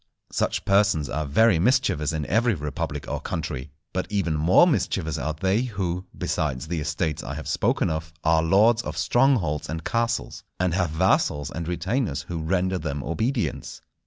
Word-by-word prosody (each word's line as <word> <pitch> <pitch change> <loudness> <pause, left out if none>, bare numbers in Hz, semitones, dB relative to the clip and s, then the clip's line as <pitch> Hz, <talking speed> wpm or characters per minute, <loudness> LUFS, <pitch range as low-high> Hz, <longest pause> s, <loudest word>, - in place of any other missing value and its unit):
Such - - -1
persons 100 -7 +2
are 80 -1 -2
very 95 +5 +4
mischievous 105 - +2
in 80 -2 -2
every 110 - +2
republic 75 -3 -4
or - - -3
country. 65 0 -4 0.2
But 95 +1 -3
even 95 -6 0
more 80 - +5
mischievous 85 - 0
are 80 +1 -2
they 95 +7 +1
who, 95 -7 -3
besides 75 -2 -2
the 85 -2 -1
estates 75 +1 -2
I - - -6
have - - -6
spoken - - +1
of, 80 0 -4
are 80 0 +4
lords 105 +8 +4
of - - -6
strongholds 120 - +2
and 80 0 -4
castles, 115 0 -1 0.2
and 90 -2 +1
have 90 -2 +1
vassals 80 -3 +1
and 85 0 -5
retainers 90 - -1
who 85 +3 -5
render 95 +3 0
them 75 -4 -4
obedience. 115 - -2
85 Hz, 165 wpm, -25 LUFS, 80-105 Hz, 0.2 s, more